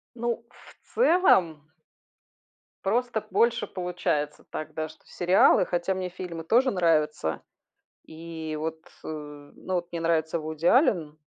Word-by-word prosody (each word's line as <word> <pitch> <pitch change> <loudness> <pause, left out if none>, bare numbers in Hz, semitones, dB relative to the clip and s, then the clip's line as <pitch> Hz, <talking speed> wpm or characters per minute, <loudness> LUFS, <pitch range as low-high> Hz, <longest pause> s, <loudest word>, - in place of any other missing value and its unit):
Ну, 235 0 -2
в - - -20
целом 190 - +3 1.2
просто 230 +1 0
больше 235 0 +2
получается 175 -5 -2
так, 155 - -6
да, 155 0 -3
что 155 - -17
сериалы. 180 +1 +4
Хотя 175 +2 -1
мне 185 -1 -3
фильмы 175 -2 -7
тоже 250 +8 +3
нравятся, 155 - +1 0.6
и 160 -1 -7
вот, 160 +1 -4 0.2
э - - -7
Ну 150 +3 -7
вот 175 -1 -2
мне 170 - -3
нравится 165 0 +1
Вуди 155 +1 -4
Аллен 175 - +3
170 Hz, 125 wpm, -26 LUFS, 155-190 Hz, 1.2 s, сериалы